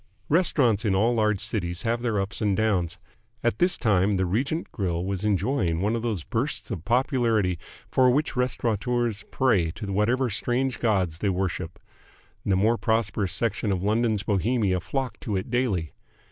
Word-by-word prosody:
Restaurants 140 - +3
in 100 -4 +1
all 115 +5 +3
large 105 -3 +1
cities 90 -5 -2
have 115 0 0
their 115 -4 0
ups 100 +4 -4
and 100 -3 +1
downs. 95 -6 0 0.5
At 120 - 0
this 180 +1 +3
time 100 -3 +2
the 95 -1 +1
Regent 135 - -1
Grill 90 -5 -2
was 95 0 -3
enjoying 100 -4 +1
one 105 +5 +1
of 115 - -2
those 110 -8 -2
bursts 120 - -3
of 90 -7 -4
popularity 115 - +1 0.3
for 130 -1 +4
which 140 +3 +1
restaurateurs 120 -2 0
pray 105 -11 +2
to 100 -3 -5
whatever 120 +6 +2
strange 125 +5 -1
gods 95 -8 0
they 100 - 0
worship. 90 -2 -2 0.7
The 95 - +1
more 110 +4 +2
prosperous 110 -4 0
section 110 -2 -1
of 95 -1 -1
London's 110 0 +1
Bohemia 100 -1 +1
flocked 130 +7 -4
to 105 - -3
it 95 - -5
daily. 105 - 0
110 Hz, 165 wpm, -26 LUFS, 95-120 Hz, 0.7 s, for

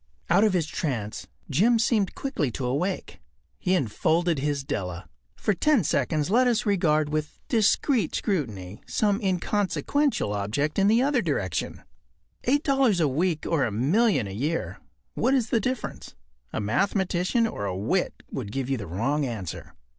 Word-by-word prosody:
” - - -38
Out 190 +4 +5
of 215 -3 +3
his 175 -4 +1
trance 120 -9 -3 0.2
Jim 210 - +3
seemed 220 -4 +1
quickly 265 - -1
to 125 -1 -2
wake. 180 +7 -2 0.4
He 185 - +1
enfolded 165 - +1
his 145 0 -1
Della. 90 -9 -4 0.3
For 210 - 0
ten 260 - +3
seconds 150 +3 0
let 250 +3 +4
us 240 -1 +1
regard 155 -7 +2
with 155 0 -3
discreet 225 - +2
scrutiny 110 - -3
some 205 0 +1
inconsequential 205 - 0
object 110 - -1
in 195 - +4
the 230 +4 +4
other 275 -3 +2
direction. 140 - -2 0.6
Eight 285 +4 +2
dollars 270 - +3
a 160 - +3
week 160 +4 0
or 160 -5 +2
a 115 - 0
million 160 - +2
a 95 - -6
year—what 160 - -2
is 240 -4 0
the 230 - +3
difference? 255 +1 -4 0.4
A - - -3
mathematician 190 - +1
or 105 - -3
a 95 -2 -2
wit 120 - -1
would 110 -6 -5
give 135 +2 -3
you 135 - +1
the 100 - -6
wrong 130 - 0
answer. 110 -10 -5
170 Hz, 160 wpm, -26 LUFS, 130-215 Hz, 0.6 s, Out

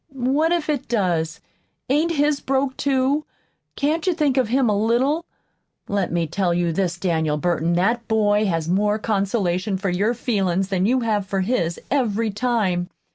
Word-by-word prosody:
"What 275 +6 +1
if 345 -3 0
it 295 -4 -2
does? 175 -8 -1 0.5
Ain't 305 +6 +1
his 295 -1 +1
broke, 265 0 -1
too? 275 +2 +1 0.5
Can't 315 +5 -1
you 360 - +2
think 295 -5 +1
of 260 -4 +2
him 255 +2 +2
a 210 - +2
little? 250 +10 +1 0.6
Let 200 -2 -1
me 170 -1 0
tell 175 +2 0
you 175 -1 +1
this, 175 0 -1
Daniel 160 -4 0
Burton 170 +1 0
that 230 +7 +1
boy 210 -1 +2
has 165 -3 -1
more 205 +4 +1
consolation 200 -2 -1
for 190 0 -2
your 205 +7 +1
feelin's 195 -5 0
than 190 0 +1
you 255 +2 +2
have 210 -4 0
for 195 0 -1
his, 185 -5 -1
every 230 -5 +1
time. 205 -6 0
210 Hz, 170 wpm, -22 LUFS, 180-260 Hz, 0.6 s, you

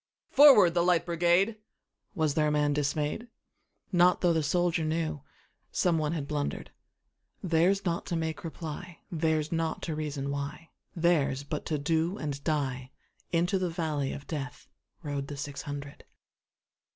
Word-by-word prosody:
"Forward, 255 - +8
the 175 - +2
Light 175 -1 +3
Brigade!"Was 175 -2 -1
there 150 0 +2
a - - +1
man 150 -1 +2
dismay'd? 150 - -1 0.6
Not 180 -1 +4
tho' 175 -2 +4
the 160 - +1
soldier 170 +2 +1
knewSome 160 +2 -2
one 155 0 0
had 150 -4 -3
blunder'd:Theirs 170 +5 -2
not 170 -1 -1
to 170 - -2
make 160 0 -3
reply, 165 +1 -7
Theirs 160 -2 0
not 165 -1 -1
to 165 - -2
reason 145 -2 -3
why, 140 +3 -5 0.3
Theirs 160 -6 +2
but 150 +1 -5
to 155 - 0
do 160 +6 0
and 140 -4 -4
die:Into 150 +5 -2
the 185 -1 0
valley 155 -5 -2
of 140 - -7
DeathRode 145 -1 -7
the 145 - -7
six 140 -1 -5
hundred. 145 0 -7
160 Hz, 135 wpm, -29 LUFS, 145-175 Hz, 0.6 s, Forward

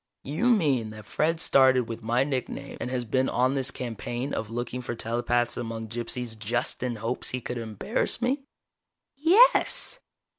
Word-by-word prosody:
"You 155 - 0
mean 145 - +2
that 110 -1 -10
Fred 160 +6 0
started 130 -5 +5
with 115 0 -6
my 120 +3 +2
nickname, 135 -3 -4
and - - -2
has 125 -1 -2
been 130 +4 +1
on 130 +2 +2
this 135 -1 +1
campaign 120 +1 -4
of 110 - -3
looking 120 +2 -4
for 120 -1 -4
telepaths 120 +1 0
among 115 -2 -4
gypsies 120 0 -3
just 115 +3 -2
in 125 -2 -1
hopes 115 +3 -2
he 125 - -2
could 125 0 -5
embarrass 115 - -2
me?" 265 +3 0 0.7
"Yes!" 390 - +4
125 Hz, 160 wpm, -27 LUFS, 115-135 Hz, 0.7 s, started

